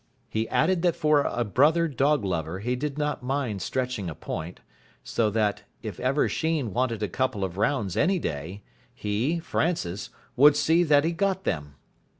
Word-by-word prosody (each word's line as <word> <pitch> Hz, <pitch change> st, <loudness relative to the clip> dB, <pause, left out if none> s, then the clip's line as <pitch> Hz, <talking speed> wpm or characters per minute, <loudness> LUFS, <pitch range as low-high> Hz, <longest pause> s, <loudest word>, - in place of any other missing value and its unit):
He 110 Hz, +1 st, -2 dB
added 170 Hz, +8 st, +2 dB
that 175 Hz, -2 st, +2 dB
for 150 Hz, -1 st, +3 dB
a 120 Hz, -3 st, -1 dB
brother 150 Hz, -, +3 dB
dog 140 Hz, -3 st, +1 dB
lover 85 Hz, -2 st, -2 dB
he 125 Hz, +4 st, -1 dB
did 145 Hz, +2 st, -3 dB
not 150 Hz, -3 st, -1 dB
mind 125 Hz, -6 st, -2 dB
stretching 125 Hz, -5 st, -2 dB
a 80 Hz, -, -7 dB
point, 80 Hz, +5 st, -6 dB, 0.4 s
so 110 Hz, -2 st, 0 dB
that, 105 Hz, -1 st, 0 dB, 0.2 s
if -, -, -6 dB
ever 130 Hz, +4 st, +2 dB
Sheen 155 Hz, -, -1 dB
wanted 115 Hz, -2 st, 0 dB
a -, -, +1 dB
couple 125 Hz, +1 st, -1 dB
of 90 Hz, -2 st, -3 dB
rounds 105 Hz, -4 st, 0 dB
any 190 Hz, +3 st, +2 dB
day, 85 Hz, -, -5 dB, 0.3 s
he, 110 Hz, +11 st, -1 dB
Francis, 160 Hz, -, -2 dB, 0.3 s
would 145 Hz, +3 st, +7 dB
see 160 Hz, +3 st, +3 dB
that 145 Hz, -2 st, +5 dB
he 165 Hz, -, +1 dB
got 190 Hz, +2 st, 0 dB
them. 75 Hz, -, -3 dB
125 Hz, 170 wpm, -26 LUFS, 100-150 Hz, 0.4 s, would